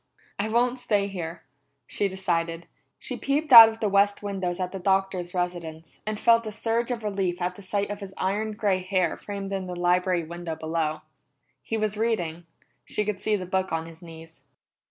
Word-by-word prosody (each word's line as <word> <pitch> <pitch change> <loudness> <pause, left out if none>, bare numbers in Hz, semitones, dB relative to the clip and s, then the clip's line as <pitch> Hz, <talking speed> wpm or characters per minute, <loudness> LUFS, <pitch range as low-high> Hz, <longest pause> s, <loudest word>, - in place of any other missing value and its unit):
"I 210 +2 0
won't 245 +3 +1
stay 210 -5 +1
here!" 170 -3 -6 0.4
she 200 - -1
decided. 170 -3 -2 0.3
She - - -5
peeped 290 +1 0
out 225 -1 +13
of 225 0 -8
the 215 - +2
west 200 +1 +2
windows 190 -3 -3
at 180 -1 -2
the 195 - -6
Doctor's 190 -1 0
residence, 170 -3 -4
and 215 0 -2
felt 230 -1 +4
a - - -4
surge 230 +3 -1
of 240 -3 -3
relief 195 -4 -1
at 180 0 -1
the 200 - -13
sight 200 +1 -2
of 205 - -5
his 195 -2 -9
iron 210 +3 -1
gray 205 -3 +1
hair 185 -2 0
framed 200 -1 -6
in 190 -1 -3
the 180 - -5
library 180 0 +1
window 170 0 -6
below. 160 -1 -2 0.6
He 225 - -3
was 215 -1 -1
reading; 175 -7 -1 0.4
she 210 - -1
could 210 -2 -2
see 215 - +1
the 185 -3 -4
book 190 +1 -1
on 165 0 -1
his 165 0 -12
knees. 165 -3 -12
190 Hz, 195 wpm, -26 LUFS, 175-210 Hz, 0.6 s, out